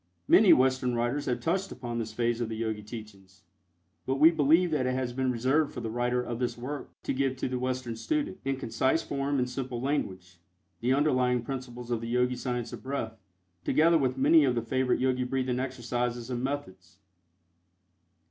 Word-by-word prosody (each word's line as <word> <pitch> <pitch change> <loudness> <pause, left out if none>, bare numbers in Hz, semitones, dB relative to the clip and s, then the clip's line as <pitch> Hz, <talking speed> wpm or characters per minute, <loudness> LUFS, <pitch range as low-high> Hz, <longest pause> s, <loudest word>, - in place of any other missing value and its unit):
Many 205 -2 +7
Western 130 -1 +3
writers 120 +5 -1
have 125 - -1
touched 185 +4 -1
upon 120 -2 -4
this 110 -1 -4
phase 120 +1 0
of 115 - -2
the 110 - -4
Yogi 110 -1 -2
teachings, 100 -4 -11 0.6
but 130 - +1
we 155 +4 +7
believe 160 +3 +3
that 135 -5 +1
it 130 - 0
has 130 -2 -2
been 130 0 0
reserved 130 +6 +1
for - - -6
the 110 - -4
writer 120 +1 0
of 120 -1 -4
this 120 -2 -1
work 135 +4 -5
to - - -1
give 135 0 0
to 130 - -2
the 125 0 -2
Western 130 -2 -2
student, 290 - -2
in 135 0 0
concise 130 +5 0
form 140 0 -1
and 125 -1 +1
simple 125 -1 -4
language, 95 - -3 0.4
the 120 +2 0
underlying 130 -4 +2
principles 125 -2 -6
of 115 -2 0
the 115 - -5
Yogi 125 +1 +1
Science 125 -2 -3
of - - -7
Breath, 115 -5 -4 0.4
together 165 - +4
with 130 -2 0
many 155 +4 +6
of 130 -3 +2
the 115 - -1
favorite 130 +2 +1
Yogi 130 0 +1
breathing 125 -1 -1
exercises 125 -1 -3
and 120 0 -2
methods. 95 -11 -5
125 Hz, 190 wpm, -29 LUFS, 120-135 Hz, 0.6 s, Many